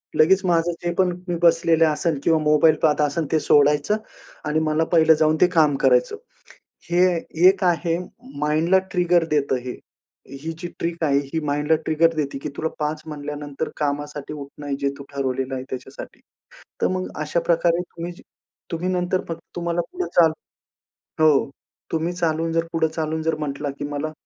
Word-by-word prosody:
लगेच 190 +5 +4
माझं 170 -1 +2
जे 175 0 -1
पण 185 -1 +3 0.2
मी 175 - -1
बसलेलं 165 -1 +4
असेल 155 0 0
किंवा 160 -1 +3
मोबाईल 155 +1 +4
पाहत 150 -1 +3
असेल, 150 +1 -1
ते 160 - +3
सोडायचं 150 +7 +3 0.5
आणि 150 +1 +1
मला 155 +1 +2
पहिलं 160 -1 +6
जाऊन 155 0 +2
ते 180 - +7
काम 150 -3 +4
करायचं. 125 - +3 0.8
हे 180 +2 +4 0.4
एक 190 0 +2
आहे 170 -1 +1 0.4
माइंडला 155 +5 +3
ट्रिगर 175 -2 +3
देतं 140 -3 +1
हे, 125 - -5 0.7
ही 165 - -3
जी 175 - -5
ट्रिक 170 0 -2
आहे. 140 -2 +3
ही 160 - 0
माइंडला 150 +2 +1
ट्रिगर 165 +1 +2
देते 140 -3 -2
की 150 - -3
तुला 160 - -1
5 150 0 -2
म्हणल्यानंतर 145 0 -5
कामासाठी 145 0 -3
उठणं 145 0 -6
जे 140 - +1
तू 140 - -9
ठरवलेलं 135 -1 -2
आहे 130 - -4
त्याच्यासाठी. 130 +1 -8 0.6
तर - - +3
मग 185 0 -2
अशा 155 +3 0
प्रकारे 170 0 +2
तुम्ही, 175 0 -7 0.6
तुम्ही 175 +2 -2
नंतर 180 0 0
फक्त 165 - -4 0.2
तुम्हाला 170 0 -1
पुढे 365 0 -3
चालू 165 -2 +5 0.9
हो. 145 -3 +4 0.4
तुम्ही 165 +2 -1
चालून 165 -2 -1
जर 165 0 +1
पुढे 160 -1 +2
चालून 160 0 -3
जर 160 -1 0
म्हटला, 145 -1 -3
की - - -3
मला 145 +2 -3
160 Hz, 165 wpm, -22 LUFS, 150-170 Hz, 0.9 s, ते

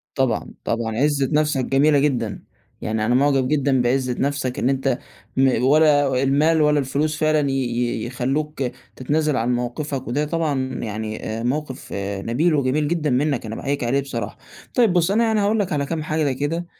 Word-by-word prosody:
طبعًا، 130 -3 -1
طبعًا، 115 -1 -2
عِزة 140 -1 +1
نفْسك 150 -3 +1
جميلة 145 +2 +3
جدًا 120 -7 -1 0.4
يعني 110 0 -1
أنا 120 +2 +2
معجب 135 -1 +3
جدًا 140 -3 +2
بعِزة 125 0 0
نفْسك 140 -2 -1
إن 125 - +1
أنت 135 -1 0 0.4
م 130 -2 +3
ولا 145 -2 +4
المال 155 +4 +3
ولا 150 -1 +3
الفلوس 145 +3 -1
فعلًا 155 -2 +2
ي - - -1
ي 120 -3 -1
يخلّوك 135 +4 -2 0.3
تتنازل 150 +2 0
عن 125 +1 +1
موقفك 130 +3 -3
وده 145 +5 0
طبعًا 145 -5 -1
يعني 110 0 -5 0.2
آآ - - -4
موقف 135 +1 -3 0.3
نبيل 150 - +1
وجميل 145 +2 +1
جدًا 155 -2 0
منّك 135 -1 0
أنا 110 +1 -5
باحيّيك 140 -2 -2
عليه 130 +4 +1
بصراحة، 115 -6 -5 0.4
طيّب 230 -7 +3
بُص 175 +2 +2
أنا 230 +3 +3
يعني 220 -2 +2
هاقول 210 +2 +2
لك 185 -4 -1
على 140 -1 0
كام 160 0 -3
حاجة 155 -3 0
كده 145 +6 -2
140 Hz, 175 wpm, -22 LUFS, 125-150 Hz, 0.4 s, ولا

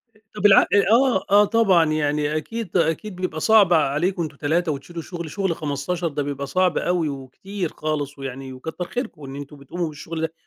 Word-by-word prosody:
أ - - -24 0.2
طب 210 - -3
الع 200 -2 +7 0.3
آه، 240 -4 +4
آه 205 +1 +7
طبعًا، 195 -7 +4
يعني 150 0 0
أكيد 215 +4 -3
أكيد 175 +4 0
بيبقى 180 -3 -3
صعب 205 -1 +5
عليكم 165 +4 +1
أنتم 155 -3 -6
3 160 +3 0
وتشيلوا 165 +4 -6
شغل 170 -2 -7
شغل 190 -4 -1
15 155 +4 -2
ده 145 -2 -2
بيبقى 140 0 -4
صعب 185 +5 +1
أوي 175 -3 0
وكتير 155 +8 -5
خالص 145 -2 -3
ويعني 135 0 -6
وكتر 160 +7 -6
خيركم 175 - -5
إن 135 0 -8
أنتم 145 +1 -9
بتقوموا 165 +5 -4
بالشغل 160 +2 -6
ده، 160 0 -2
160 Hz, 185 wpm, -23 LUFS, 145-185 Hz, 0.3 s, الع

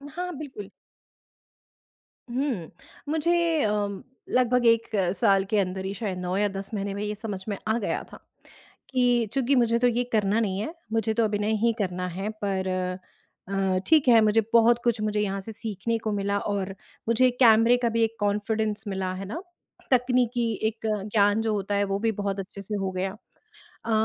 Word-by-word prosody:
हाँ, 360 +1 -3
बिल्कुल। 260 -10 -8 1.6
हुँ। 245 - -2 0.4
मुझे 320 +2 +1 0.3
अ, 210 - +2 0.6
लगभग 250 -1 +2
1 230 0 +4 0.3
साल 195 +1 +3
के 215 - +1
अंदर 190 0 -2
ही 195 - -3
शायद 200 -3 -4
9 180 0 -2
या 205 +1 +2
10 195 +2 -6
महीने 200 -1 -2
में 200 +1 -4
ये 210 0 -3
समझ 205 -3 -5
में 200 - -2
आ 220 +1 +2
गया 205 - -2
था, - - -10 0.7
कि 245 -3 +2
चूँकि 275 0 +2
मुझे 235 -2 +3
तो 245 - +4
ये 245 0 +1
करना 210 0 +2
नहीं 195 -4 -1
है, 310 - -4 0.2
मुझे 225 -1 +1
तो 230 +1 +2
अभिनय 210 0 0
ही 230 - +3
करना 180 -2 -2
है 195 +2 -2
पर 190 -2 -1 0.8
अ, 195 -1 +1
ठीक 310 -4 +4
है, 230 -2 +7
मुझे 215 +1 +4
बहुत 235 +1 +5
कुछ 235 -2 +1
मुझे 210 0 0
यहाँ 195 -1 -2
से 225 - -7
सीखने 220 +1 -3
को 220 -1 -3
मिला 200 0 0
और 195 -1 -2 0.3
मुझे 255 +2 +4
कैमरे 230 0 +6
का 245 -1 0
भी 230 0 +1
एक 225 0 0
कॉन्फिडेंस 210 +1 -1
मिला 190 -2 -2
है 195 +1 -6
ना? 300 - -5 0.5
तकनीकी 245 -2 +2 0.2
एक 225 0 -5 0.3
ज्ञान 205 0 +3
जो 220 -1 0
होता 205 0 -1
है, 200 - +2
वो 195 0 -1
भी 225 +1 +1
बहुत 200 -1 -3
अच्छे 195 +1 -7
से 210 +2 -4
हो 195 -2 -2
गया। 185 +1 -2 0.7
अ, 230 - -2
215 Hz, 185 wpm, -26 LUFS, 195-235 Hz, 1.6 s, है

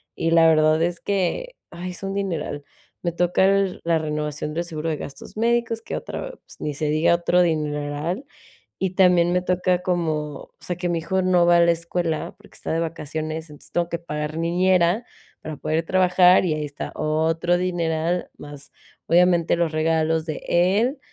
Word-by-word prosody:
Y 165 - -1
la 165 -1 +6
verdad 155 0 +4
es 175 0 -1
que, 200 - -1 0.2
ay, 175 +1 -6
es 180 - -10
un 195 - -3
dineral. 170 -7 -3 0.4
Me 170 - 0
toca 180 +2 +2
el 195 -1 +2
la 165 -1 +2
renovación 150 -1 -3
del 170 - -1
seguro 165 -1 -4
de 155 - -1
gastos 140 +9 -9
médicos, 230 0 +1
que - - -5
otra, - - -6
pues, - - -16
ni 150 - -3
se 155 +2 -3
diga 155 +3 +3
otro 175 +1 +2
dineral, 150 - -2 0.5
y 190 - 0
también 180 -2 +4
me 180 - +2
toca 180 0 +1
como, 175 -3 0 0.3
o - - -16
sea, 180 - -4
que 180 0 -2
mi 170 - 0
hijo 190 +3 -1
no 180 -2 +3
va 175 0 +5
a - - +5
la 170 0 +5
escuela, 170 -1 -3
porque - - -18
está - - -6
de 165 - 0
vacaciones, 160 0 -4
entonces 150 - -15
tengo 170 -1 0
que 170 - -2
pagar 150 -2 -5
niñera 180 +4 +2 0.4
para 155 -1 -6
poder 160 +3 -1
trabajar 180 0 +4
y 165 - +1
ahí 155 0 -3
está 145 - -7
otro 160 +3 +1
dineral, 175 -1 -1
más 145 -1 -11 0.3
obviamente 175 -1 +3
los 170 -2 0
regalos 160 0 +1
de 155 - -5
él, 205 - +2
170 Hz, 185 wpm, -23 LUFS, 155-180 Hz, 0.5 s, la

